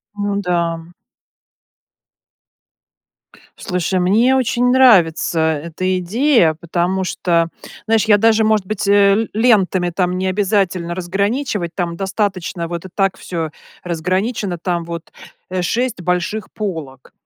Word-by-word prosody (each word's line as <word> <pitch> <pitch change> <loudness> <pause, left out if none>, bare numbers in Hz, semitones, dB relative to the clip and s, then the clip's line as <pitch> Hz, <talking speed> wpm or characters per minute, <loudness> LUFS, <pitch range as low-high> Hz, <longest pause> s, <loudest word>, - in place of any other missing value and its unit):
Ну 205 -1 -2
да. 170 -2 -2 2.7
Слушай, 180 0 -1
мне 225 +9 +3
очень 245 0 +1
нравится 190 -11 +4
эта 165 +4 -1
идея, 205 - +2
потому 175 +3 -1
что, 170 -2 0 0.4
знаешь, 225 0 +2
я 210 -1 +5
даже 220 +1 +3
может 215 -2 +2
быть, 200 0 -3
э, 200 0 +5
л 220 +1 0
лентами, 200 -6 +2
там, 180 +1 -1
необязательно 185 -2 0
разграничивать. 200 - -2
Там 170 -1 -2
достаточно 190 -3 -2
вот 170 +1 -6
и - - -8
так 195 -2 0
всё 165 -3 -4 0.3
разграничено, 185 +3 -2
там, 175 0 -2
вот, 170 -1 -7 0.4
э, 185 0 -2
6 240 +3 -1
больших 180 +4 -2
полок. 160 - -6
185 Hz, 120 wpm, -18 LUFS, 170-210 Hz, 2.7 s, я